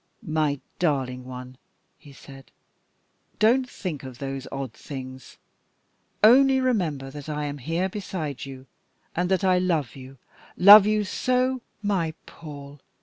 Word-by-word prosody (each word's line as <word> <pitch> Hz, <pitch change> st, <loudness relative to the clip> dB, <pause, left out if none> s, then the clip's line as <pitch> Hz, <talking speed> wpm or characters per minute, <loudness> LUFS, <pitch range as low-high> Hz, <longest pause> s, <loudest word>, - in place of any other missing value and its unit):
"My 155 Hz, -2 st, 0 dB, 0.2 s
darling 130 Hz, -6 st, -1 dB
one," 125 Hz, 0 st, -9 dB, 0.4 s
he 145 Hz, -, -15 dB
said, 135 Hz, -1 st, -14 dB, 0.9 s
"don't 250 Hz, +4 st, +3 dB
think 175 Hz, -, -5 dB
of 130 Hz, -2 st, -10 dB
those 135 Hz, 0 st, -5 dB
odd 135 Hz, -4 st, -5 dB
things. 130 Hz, -2 st, -9 dB, 0.9 s
Only 265 Hz, +4 st, +6 dB
remember 170 Hz, -, -1 dB
that 145 Hz, +1 st, -9 dB
I 150 Hz, 0 st, -3 dB
am 145 Hz, 0 st, -5 dB
here 165 Hz, +7 st, -1 dB
beside 180 Hz, -8 st, -5 dB
you, 135 Hz, -1 st, -9 dB, 0.5 s
and 180 Hz, +1 st, 0 dB
that 190 Hz, +1 st, +1 dB
I 185 Hz, -1 st, +3 dB
love 165 Hz, -8 st, -1 dB
you, 135 Hz, 0 st, -12 dB, 0.4 s
love 200 Hz, +2 st, +10 dB
you 215 Hz, 0 st, +2 dB
so 255 Hz, +5 st, 0 dB
" -, -, -44 dB
"My 165 Hz, -4 st, -1 dB
Paul!" 145 Hz, -2 st, -11 dB
150 Hz, 140 wpm, -25 LUFS, 135-190 Hz, 0.9 s, love